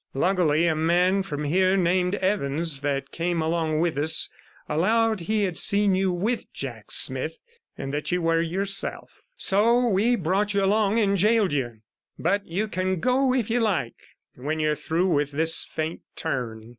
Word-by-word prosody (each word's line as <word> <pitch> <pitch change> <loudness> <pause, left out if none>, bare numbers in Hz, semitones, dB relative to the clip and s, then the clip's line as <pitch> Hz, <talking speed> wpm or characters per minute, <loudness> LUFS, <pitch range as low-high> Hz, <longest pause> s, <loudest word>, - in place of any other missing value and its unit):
Luckily, 170 0 +2
a 165 - +2
man 175 +5 +2
from 150 -6 -5
here 185 +5 +2
named 180 +1 +1
Evans, 165 -6 0
that 140 -1 -2
came 170 0 -2
along 160 -1 0
with 165 -4 0
us, 155 +2 +2 0.4
allowed 220 +7 +1
he 210 +5 -1
had 180 -4 -1
seen 200 -1 +3
you 190 0 +1
with 210 +7 -2
Jack - - -7
Smith, 480 - -2 0.4
and 135 - -5
that 150 +3 -2
you 180 - +1
were 165 -1 +1
yourself. 195 +4 -2 0.2
So 230 +5 +3
we 220 +5 +2
brought 200 +2 -1
you 200 - +2
along 205 +2 +2
and 200 -3 +2
gaoled 210 -3 +3
you, 120 -6 -3 0.4
but 200 +5 0
you 195 +6 -2
can 185 -2 -2
go 255 +5 +2
if 245 -4 0
you 245 - +2
like 195 - 0 0.4
when 150 +5 -3
you're 155 0 +1
through 165 +4 0
with 145 -1 0
this 160 +2 +1
faint 160 +1 -4
turn.' 115 -7 -4
180 Hz, 170 wpm, -25 LUFS, 155-200 Hz, 0.4 s, seen